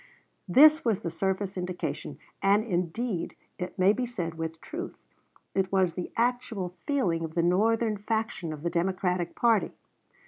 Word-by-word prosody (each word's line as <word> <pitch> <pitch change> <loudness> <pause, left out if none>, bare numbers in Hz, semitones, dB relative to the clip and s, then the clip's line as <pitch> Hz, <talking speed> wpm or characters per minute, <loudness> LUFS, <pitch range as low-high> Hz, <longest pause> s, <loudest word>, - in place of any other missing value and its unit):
This 305 - +7
was 225 -5 +1
the 170 - -3
surface 190 +3 -2
indication, 180 0 -4 0.2
and, 200 +2 +4
indeed, 180 0 -2 0.2
it 180 +2 -5
may 190 +2 +5
be 250 +2 -2
said 175 -9 -4
with 165 0 -5
truth, 340 - -6 0.6
it 190 -1 0
was 190 -3 +2
the 180 +1 -5
actual 235 -5 0 0.2
feeling 190 - +1
of 160 0 -6
the 170 - +2
Northern 215 +5 +2
faction 220 -5 -2
of 150 -1 -7
the 170 - -1
Democratic 180 0 0
party. 230 -3 +2
190 Hz, 150 wpm, -28 LUFS, 175-225 Hz, 0.6 s, This